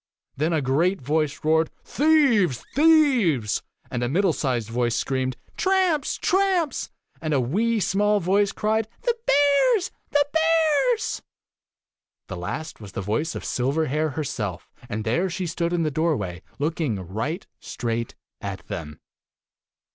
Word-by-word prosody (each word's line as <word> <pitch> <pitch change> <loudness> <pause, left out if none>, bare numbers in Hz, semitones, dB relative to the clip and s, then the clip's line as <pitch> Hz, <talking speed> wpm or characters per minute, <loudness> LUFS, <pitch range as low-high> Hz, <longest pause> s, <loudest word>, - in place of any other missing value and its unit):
Then 155 +4 0
a 160 -4 +1
great 165 +9 +2
voice 150 +2 -1
roared, 160 +1 +3
4 295 - -2
Thieves! 235 - +4
Thieves! 260 - +4
' - - -34
and 120 - -2
a 120 - 0
middle 180 +4 +2
sized 125 -7 -1
voice 120 0 0
screamed, 130 +1 -1 0.2
'Tramps! 370 -6 +2
Tramps!' 375 -4 +1 0.3
and 155 -2 0
a - - +3
wee, 215 - +1
small 205 +2 +2
voice 195 +2 +2
cried, 220 +1 0
' - - -36
The 475 -1 +1
bears! 290 - +4 0.2
The 290 0 +3
bears! 325 +7 +2 0.6
' - - -69
The - - -5
last 160 -6 -5
was 100 -3 -10
the 95 - -3
voice 115 - -1
of - - -5
Silverhair 150 +3 0
herself, 105 - -4 0.2
and 110 +1 -3
there 165 - +1
she 180 +1 -3
stood 170 0 -1
in 175 -1 +1
the 155 - 0
doorway, 135 - -1 0.2
looking 150 -4 -1
right 145 - -3
straight 115 -1 -3 0.3
at - - -6
them. 75 -1 -6
165 Hz, 145 wpm, -24 LUFS, -, 0.6 s, Thieves